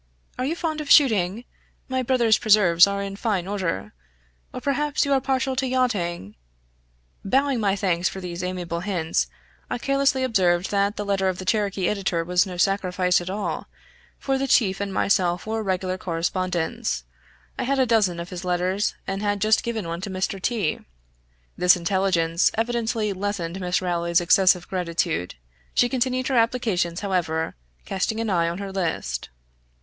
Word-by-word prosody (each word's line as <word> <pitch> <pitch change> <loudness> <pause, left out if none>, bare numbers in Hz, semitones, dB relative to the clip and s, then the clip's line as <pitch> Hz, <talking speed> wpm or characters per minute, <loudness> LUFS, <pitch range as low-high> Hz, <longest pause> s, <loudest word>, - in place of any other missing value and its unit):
Are 255 - 0
you 310 +5 -1
fond 315 -3 -2
of 295 - -7
shooting? 220 -5 +4 0.4
My 260 0 -1
brother's 240 -3 +3
preserves 200 -6 +5
are 200 0 -2
in 195 0 -5
fine 200 -6 -1
order 175 - -3 0.6
or - - -6
perhaps 290 +1 0
you 280 - +1
are 270 - +2
partial 265 0 0
to 265 0 0
yachting 190 - -1 0.5
" - - -40
Bowing 270 -1 +3
my 200 -3 +1
thanks 185 -2 0
for 190 - -7
these 180 -1 -5
amiable 180 -2 -3
hints, 175 -4 -1 0.4
I - - -2
carelessly 275 +1 +1
observed 185 -7 +2
that 200 +1 +1
the 205 - -4
letter 195 -1 +1
of 185 - -3
the 185 - -7
Cherokee 200 -3 0
editor 195 -5 -1
was 180 +3 +2
no 180 -1 -6
sacrifice 185 -1 +1
at 175 - -6
all, 205 +2 -3 0.5
for 270 -1 -1
the 275 - -1
chief 200 -7 +3
and 200 -1 -2
myself 180 -3 +1
were 220 0 -2
regular 185 -2 -2
correspondents; 175 - -2 0.6
I - - 0
had 275 +2 +1
a 260 - +4
dozen 210 -7 +2
of 170 +1 -7
his 180 0 -6
letters, 180 +3 0
and 195 +1 -3
had 205 -1 0
just 215 +2 +3
given 225 -6 -3
one 170 +1 -4
to 195 - -5
Mr. 190 +1 -3
T. 210 -8 0 0.8
This 180 +1 +5
intelligence 175 -2 +1
evidently 225 -2 -1
lessened 190 -2 -3
Miss 180 +1 0
Rowley's 170 -1 +1
excessive 180 0 +4
gratitude. 170 - -2 0.4
She 245 - +4
continued 255 0 0
her 260 - +1
applications, 220 -7 +1
however, 170 -5 -1 0.3
casting 205 +3 -2
an 225 -2 -1
eye 170 -2 +2
on 170 - -4
her 200 0 -5
list. 160 - -3
195 Hz, 170 wpm, -24 LUFS, 175-225 Hz, 0.8 s, preserves